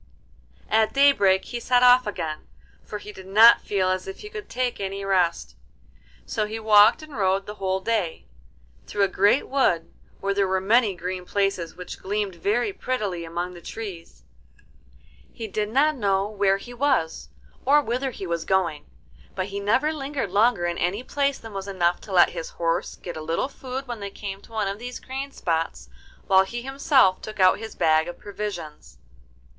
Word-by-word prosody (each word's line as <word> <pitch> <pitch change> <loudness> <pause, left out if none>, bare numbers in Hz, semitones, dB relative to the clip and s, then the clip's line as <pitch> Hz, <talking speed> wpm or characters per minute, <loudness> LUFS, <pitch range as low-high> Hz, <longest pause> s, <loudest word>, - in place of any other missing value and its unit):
At 220 0 +2
daybreak 205 -10 +4
he 240 - -5
set 250 +1 +2
off 250 -1 +6
again, 160 -6 -4 0.4
for 210 - -6
he 210 0 -10
did 190 -1 -12
not 220 +4 +7
feel 190 -2 0
as 185 0 -2
if 190 - -8
he 420 - -8
could 425 -2 -8
take 250 -1 -2
any 195 0 -4
rest. 180 -3 0 0.7
So 215 -3 -2
he 220 +1 -5
walked 220 +5 +6
and 305 -3 -11
rode 195 -1 +1
the 210 - -6
whole 190 0 0
day, 195 -5 -2 0.6
through 205 - 0
a - - +4
great 200 +7 +2
wood 260 -12 +1 0.3
where 200 0 -1
there 200 -1 +1
were 190 0 +1
many 210 +1 +3
green 180 +1 -5
places 195 -3 -1
which 180 0 -8
gleamed 205 0 -2
very 215 - 0
prettily 210 - -3
among 175 +2 -4
the 175 - -12
trees. 170 - -8 1.1
He 225 - -7
did 210 +1 -2
not 295 +6 +3
know 195 -3 +1
where 200 -2 +1
he 240 +5 -11
was 165 - 0 0.3
or 285 +3 +5
whither 260 0 -1
he 210 -6 -7
was 170 -2 -2
going, 175 -6 0 0.5
but 185 +1 -3
he 200 0 -4
never 255 +10 +1
lingered 275 - -4
longer 205 -2 +3
in 175 0 -2
any 195 +7 -1
place 280 +1 0
than 225 -2 -11
was 195 0 -5
enough 175 -3 0
to 205 - -11
let 180 -2 +6
his 165 - -6
horse 165 -1 -2
get 175 -3 -8
a - - -5
little 165 +10 -1
food 265 -1 -6
when 240 -3 -6
they 200 -1 -5
came 195 -1 -7
to 230 - -19
one 215 -3 -1
of 200 +1 -4
these 245 +1 -6
green 270 +2 -6
spots, 165 - -2 0.4
while 190 0 +5
he 235 +5 -6
himself 270 -7 +3
took 215 -1 -8
out 185 +1 +5
his 225 0 -8
bag 160 0 +3
of 175 - -7
provisions. 200 -7 -7
200 Hz, 185 wpm, -24 LUFS, 185-240 Hz, 1.1 s, not